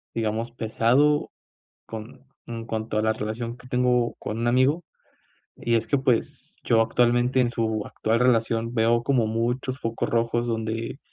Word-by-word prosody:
digamos, 115 +1 -1
pesado 120 +6 +2 0.6
con 110 +4 -9 0.2
en 115 -1 -6
cuanto 110 -1 -3
a - - +3
la 110 0 +2
relación 115 +3 -4
que 125 - -15
tengo 125 -1 +2
con 110 - -4
un 120 - 0
amigo, 130 +7 +3 0.7
y 120 - -2
es 115 0 0
que, 140 - +2
pues, 130 -3 -1
yo 115 -1 +4
actualmente 120 +2 +2
en 120 - +2
su 110 -2 -1
actual 115 +2 0
relación 115 -1 +2
veo 115 +1 +3
como 130 -4 +2
muchos 120 +4 -1
focos 115 -2 -2
rojos 115 0 +1
donde, 115 +2 -3
115 Hz, 155 wpm, -25 LUFS, 115-125 Hz, 0.7 s, yo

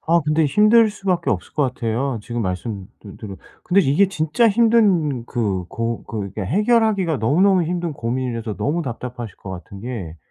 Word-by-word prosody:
아 170 +1 +5
근데 155 +1 +2
힘들 215 +7 +5
수밖에 185 -4 -1
없을 - - -3
것 150 - +1
같아요. 125 0 -1
지금 120 +2 -4
말씀들 95 +1 -6
들은 100 -3 -8 0.3
근데 195 +2 +5
이게 165 +6 +3
진짜 190 +6 +2
힘든 200 - +3
그 100 -7 -1
고 115 0 -3
그 100 -4 -5
해결하기가 200 - +2
너무너무 180 - +3
힘든 170 0 -2
고민이라서 120 -3 -3
너무 165 +4 -1
답답하실 120 -3 -6
것 95 - -9
같은 95 +2 -9
게 105 -9 -6
135 Hz, 340 characters per minute, -21 LUFS, 115-185 Hz, 0.3 s, 아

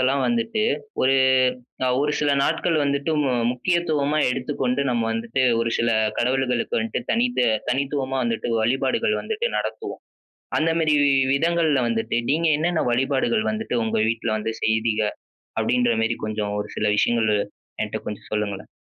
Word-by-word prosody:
எல்லாம் 130 +1 +2
வந்துட்டு 230 -2 0 0.4
ஒரு 135 +1 +4 0.7
அ, - - +1
ஒரு 150 +1 +1
சில 145 -1 +1
நாட்கள் 165 +3 +1
வந்துட்டு 140 +2 0
மு 135 - +1 0.2
முக்கியத்துவமா 155 0 0
எடுத்துக்கொண்டு 130 0 -1
நம்ம 120 -2 0
வந்துட்டு, 115 +3 -1 0.2
ஒரு 115 0 0
சில 115 - +1 0.3
கடவுள்களுக்கு 125 -1 0
வந்துட்டு 115 +2 -2
தனித்து 235 - +1 0.2
தனித்துவமா 135 0 -1
வந்துட்டு 115 0 -2
வழிபாடுகள் 130 - +1
வந்துட்டு 450 +2 -2
நடத்துவோம். - - -4 0.6
அந்தமாரி 160 -1 +2
வி-வி 135 -1 +4
விதங்கள்ல 160 -1 +2
வந்துட்டு, 115 -1 -1
நீங்க 160 +3 +2
என்னென்ன 165 +1 0
வழிபாடுகள் 135 - +1
வந்துட்டு 215 - -2
உங்க 110 - -1
வீட்ல 115 0 -2
வந்து 110 +1 -3
செய்வீங்க? 110 0 +1 0.6
அப்பிடின்றமாரி, 115 -2 +1
கொஞ்சம் 105 -1 -3
ஒரு 105 - -4
சில 105 - +1
விஷயங்கள், 115 -1 +2 0.5
என்ட்ட - - -3
கொஞ்சம் 105 - -7
சொல்லுங்களேன்? 105 -2 -3
130 Hz, 135 wpm, -23 LUFS, 115-155 Hz, 0.7 s, ஒரு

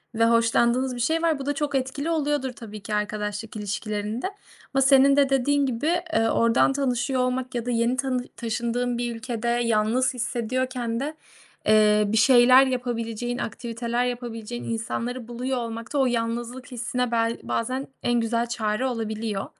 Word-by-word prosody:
ve 230 +1 +3
hoşlandığınız 235 +2 +2
bir 240 - -6
şey 320 +7 +1
var. 325 -3 +1
Bu 270 - -5
da 290 - 0
çok 290 0 -2
etkili 270 +4 -1
oluyordur 295 -4 0
tabii 215 -3 -9
ki 210 - -5
arkadaşlık 210 +1 -3
ilişkilerinde 215 - -3 0.5
ama 270 - +3
senin 270 +1 +6
de 280 -1 +4
dediğin 280 +2 +2
gibi, 255 +4 -1 0.3
ııı, 225 0 +3
oradan 230 +4 +3
tanışıyor 260 -1 0
olmak 255 0 -2
ya 240 -1 -2
da 245 - -1
yeni 235 +1 +1
tanış 255 -2 -1
taşındığın 235 +1 -1
bir 240 -1 -2
ülkede 235 0 -4
yalnız 235 +1 +2
hissediyorken 245 0 -2
de, 295 +3 -3 0.5
eee, 210 0 +5
bir 220 +2 0
şeyler 255 +2 +7
yapabileceğin, 240 -1 -2
aktiviteler 235 +1 -2
yapabileceğin 240 -1 -5
insanları 230 +2 -3
buluyor 250 +2 -3
olmak 230 0 -5
da - - 0
o 270 - +4
yalnızlık 240 +2 -2
hissine 245 0 -2
bel 230 0 +1
bazen 255 +4 -2 0.2
en 240 0 +2
güzel 230 +1 0
çare 220 +1 -1
olabiliyor. 220 -4 -2
240 Hz, 160 wpm, -25 LUFS, 230-260 Hz, 0.5 s, şeyler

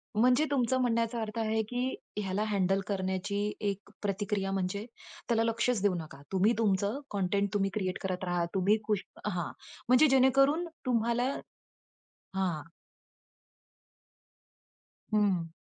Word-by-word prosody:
म्हणजे 250 +7 +4
तुमचं 260 -2 +2
म्हणण्याचा 230 -1 +1
अर्थ 220 +1 -5
आहे 220 0 +1
की 250 +1 -1 0.2
ह्याला 200 0 -1
हँडल 195 -2 +2
करण्याची 190 +1 -1 0.3
एक 200 0 -6
प्रतिक्रिया 200 -1 -1
म्हणजे 195 +2 -2 0.4
त्याला 225 -1 +2
लक्षच 230 -1 +1
देऊ 205 -2 +3
नका. 155 -4 -7
तुम्ही 195 +4 +3
तुमचं 205 +3 +1
कंटेंट 200 0 +1
तुम्ही 195 -1 +2
क्रिएट 185 -4 -1
करत 185 -1 -3
राहा. 175 -1 0
तुम्ही 195 +2 +3
खुश 210 -2 +1 0.2
हां, 180 -6 -2 0.4
म्हणजे 255 +5 +6
जेणेकरून 275 +5 +4 0.2
तुम्हाला 240 +2 +1 1.0
हां. 180 -6 0 2.5
हं. 190 -6 +2
205 Hz, 120 wpm, -30 LUFS, 190-235 Hz, 2.5 s, म्हणजे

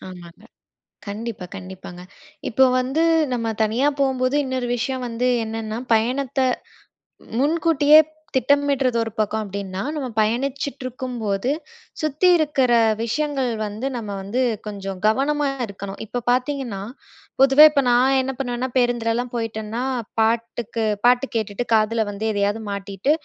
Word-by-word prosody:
ஆமாங்க. 180 +1 -12 0.6
கண்டிப்பா, 210 -1 -5
கண்டிப்பாங்க. 185 -2 -9 0.5
இப்போ 265 +3 +4 0.2
வந்து 265 +6 0 0.3
நம்ம 235 -2 -1 0.2
தனியா 230 +6 +2
போம்போது 260 0 +1
இன்னொரு 260 -2 -2
விஷயம் 255 +1 -2
வந்து 235 +2 -1 0.2
என்னென்னா, 220 0 -4 0.2
பயணத்த 255 +4 0 1.0
முன்கூட்டியே 305 0 +5 0.4
திட்டமிட்றது 275 -2 +2
ஒரு 225 - -5
பக்கம் 215 +1 0
அப்பிடின்னா, 195 -1 -5
நம்ம 280 -4 -3
பயணிச்சிட்டு 265 +5 -2
இருக்கும்போது, 245 -3 -2 0.5
சுத்தி 310 +4 +1
இருக்கிற 290 -5 +1 0.3
விஷயங்கள் 275 0 -1 0.2
வந்து 215 +6 -4
நம்ம 220 -3 -6
வந்து 205 +7 -2 0.3
கொஞ்சம் 195 -2 -5
கவனமா 280 +6 +2 0.2
இருக்கணும். 200 -1 -8
இப்போ 245 +3 -4
பாத்தீங்கன்னா, 250 -5 -1 0.6
பொதுவாவே 270 +2 +8
இப்ப 280 - +2
நான் 255 +3 +4
என்ன 265 +1 -2
பண்ணுவேன்னா, 245 -1 -2
பேருந்துலலாம் 240 0 0
போயிட்டேன்னா, 225 0 -3 0.4
பாட்டுக்கு 230 0 0 0.2
பாட்டு 245 +2 +5
கேட்டுட்டு, 220 +1 -2
காதில 220 0 +2
வந்து 205 +2 -5
எதையாது 205 +1 0
மாட்டிட்டு, 200 +5 -2
240 Hz, 120 wpm, -22 LUFS, 215-265 Hz, 1.0 s, பொதுவாவே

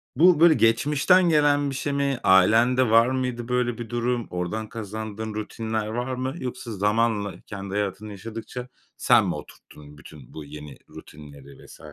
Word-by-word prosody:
bu, 175 0 +5
böyle, 170 0 +7
geçmişten 150 +9 +3
gelen 145 -2 +3
bir 135 - -5
şey 145 +2 -3
mi? 140 -2 -1
Ailende 115 +7 +4
var 115 +2 +5
mıydı 125 -2 -3
böyle 125 -1 -1
bir 120 -2 -7
durum? 120 0 -2
Oradan 90 +5 -4
kazandığın 110 0 -6
rutinler 110 0 -4
var 120 +4 -3
mı? 130 +1 -3
Yoksa 125 -2 -6
zamanla 105 -2 0
kendi 100 -1 -7
hayatını 105 +1 -3
yaşadıkça 115 +4 -8 0.3
sen - - +4
mi - - -2
oturttun 75 0 -13
bütün 75 -4 -14
bu 75 - -8
yeni 75 -1 -10
rutinleri 70 -2 -14
vs. - - -15
115 Hz, 155 wpm, -24 LUFS, 100-125 Hz, 0.3 s, böyle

